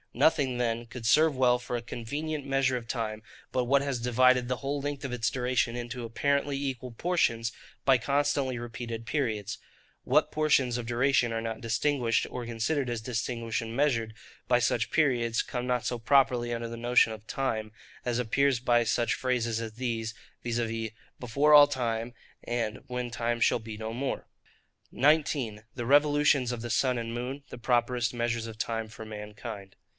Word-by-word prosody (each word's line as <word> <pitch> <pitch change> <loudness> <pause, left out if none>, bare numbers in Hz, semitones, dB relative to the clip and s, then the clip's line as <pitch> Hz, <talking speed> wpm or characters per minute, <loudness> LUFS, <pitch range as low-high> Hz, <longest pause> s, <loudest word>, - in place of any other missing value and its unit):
Nothing 140 -6 +2
then 120 -1 -1
could 115 -1 -8
serve 150 +5 +4
well 125 -1 +4
for 125 0 -4
a - - -4
convenient 145 +6 -4
measure 135 -1 +1
of 120 -2 -5
time, 110 -3 -3 0.3
but 125 - +2
what 135 +3 +3
has 140 -3 -2
divided 125 +1 +3
the 125 0 -1
whole 140 +2 -3
length 145 -1 -4
of 130 - -4
its 110 -4 0
duration 125 -1 0
into 120 0 -5
apparently 140 +4 0
equal 130 -3 -4
portions, 115 -6 0 0.3
by 135 -1 +6
constantly 140 +1 0
repeated 115 -1 -6
periods. 110 -6 -2 0.5
What - - +3
portions 140 -5 +2
of 120 - -4
duration 120 0 +2
are 115 - -1
not 115 -1 -4
distinguished, 115 +1 +1
or 125 -1 -5
considered 120 +4 -1
as 120 -1 -2
distinguished 115 0 -2
and 115 0 -6
measured, 115 -6 +1 0.4
by 125 - +5
such 120 -1 +1
periods, 120 -7 +2
come 125 -1 -4
not 125 -1 0
so 120 - -1
properly 125 -1 +3
under 115 0 -3
the 115 - -6
notion 120 -1 +3
of 110 -1 -11
time; 110 -5 -2 0.3
as 120 -1 -1
appears 130 +2 +2
by 120 -1 +3
such 115 +1 +1
phrases 120 -3 -1
as 110 -1 -5
these, 115 -2 -3 0.3
viz. 115 -2 -2 0.3
'Before 140 +5 +2
all 145 -1 +10
time,' 120 -3 -2 0.3
and 115 -3 -2
'When 125 -1 -3
time 120 0 -1
shall 115 - +3
be 110 -1 -8
no 110 +1 -5
more.' 135 +3 -3 0.6
19. 135 -6 +2
The 120 -2 -4
Revolutions 145 -2 +4
of 120 -2 -4
the 120 0 -4
Sun 130 -2 +2
and 115 -1 -4
Moon, 130 +4 -4
the - - -9
properest 120 -1 +1
Measures 120 -1 -1
of 110 -1 -9
Time 115 -1 -2
for 110 0 -9
mankind. 105 -2 -8
120 Hz, 175 wpm, -29 LUFS, 115-135 Hz, 0.6 s, all